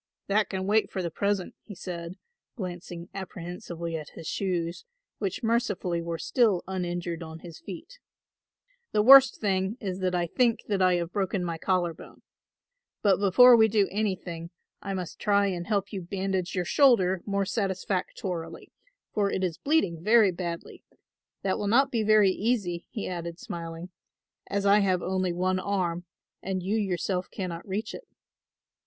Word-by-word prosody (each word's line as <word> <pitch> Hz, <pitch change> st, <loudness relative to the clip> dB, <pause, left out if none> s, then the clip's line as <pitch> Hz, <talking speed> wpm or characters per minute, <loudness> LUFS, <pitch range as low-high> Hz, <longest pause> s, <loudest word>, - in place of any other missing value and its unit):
"That 210 Hz, +2 st, +1 dB
can 190 Hz, -1 st, -3 dB
wait 215 Hz, +2 st, +2 dB
for 190 Hz, -, -3 dB
the 170 Hz, -, -3 dB
present," 200 Hz, +1 st, -1 dB
he 205 Hz, -, -11 dB
said, 170 Hz, -1 st, -6 dB, 0.4 s
glancing 175 Hz, -4 st, -6 dB
apprehensively 175 Hz, -2 st, -6 dB
at 155 Hz, -2 st, -6 dB
his -, -, -9 dB
shoes, 175 Hz, -2 st, -2 dB, 0.4 s
which 195 Hz, +1 st, -3 dB
mercifully 210 Hz, -7 st, 0 dB
were 165 Hz, 0 st, -3 dB
still 215 Hz, -2 st, +2 dB
uninjured 175 Hz, -2 st, -3 dB
on 160 Hz, 0 st, -8 dB
his 170 Hz, -3 st, -10 dB
feet; 205 Hz, -, -10 dB, 0.9 s
"the 210 Hz, -, +3 dB
worst 270 Hz, +2 st, +8 dB
thing 195 Hz, +1 st, 0 dB
is 190 Hz, -3 st, -4 dB
that 185 Hz, -1 st, 0 dB
I 175 Hz, -1 st, +1 dB
think 235 Hz, +6 st, +1 dB
that 200 Hz, -2 st, 0 dB
I 185 Hz, -1 st, +4 dB
have 170 Hz, -1 st, -2 dB
broken 195 Hz, -2 st, -1 dB
my 165 Hz, -2 st, -3 dB
collar 180 Hz, -2 st, +1 dB
bone. -, -, -15 dB, 0.8 s
But 195 Hz, -3 st, +4 dB
before 240 Hz, +6 st, +7 dB
we 220 Hz, -1 st, +6 dB
do 210 Hz, -2 st, +2 dB
anything 185 Hz, -5 st, -3 dB, 0.3 s
I 195 Hz, -1 st, -4 dB
must 180 Hz, -3 st, -6 dB
try 200 Hz, -1 st, +3 dB
and 175 Hz, -3 st, -3 dB
help 205 Hz, -1 st, -1 dB
you 195 Hz, -, -3 dB
bandage 190 Hz, 0 st, -2 dB
your 180 Hz, -1 st, 0 dB
shoulder 190 Hz, -11 st, +4 dB
more 200 Hz, -1 st, 0 dB
satisfactorily 185 Hz, -4 st, -3 dB, 0.4 s
for 205 Hz, -2 st, +1 dB
it 190 Hz, -, -2 dB
is 175 Hz, -3 st, -2 dB
bleeding 195 Hz, -, +1 dB
very 215 Hz, -1 st, +5 dB
badly. 170 Hz, -1 st, -6 dB, 0.6 s
That 190 Hz, -1 st, 0 dB
will 205 Hz, -, -2 dB
not 270 Hz, +6 st, +4 dB
be 230 Hz, -, +1 dB
very 215 Hz, -2 st, +5 dB
easy," 195 Hz, -5 st, -1 dB
he 215 Hz, -, -5 dB
added, 170 Hz, -2 st, -5 dB
smiling, 170 Hz, 0 st, -7 dB, 0.6 s
"as 200 Hz, 0 st, -1 dB
I 200 Hz, +1 st, +6 dB
have 185 Hz, -3 st, +1 dB
only 185 Hz, -1 st, 0 dB
one 185 Hz, +2 st, 0 dB
arm 180 Hz, -3 st, -1 dB, 0.4 s
and 190 Hz, -1 st, -3 dB
you 200 Hz, +4 st, 0 dB
yourself 185 Hz, -3 st, -1 dB
cannot 180 Hz, -3 st, -5 dB
reach 200 Hz, +4 st, -3 dB
it." -, -, -10 dB
190 Hz, 160 wpm, -27 LUFS, 175-205 Hz, 0.9 s, worst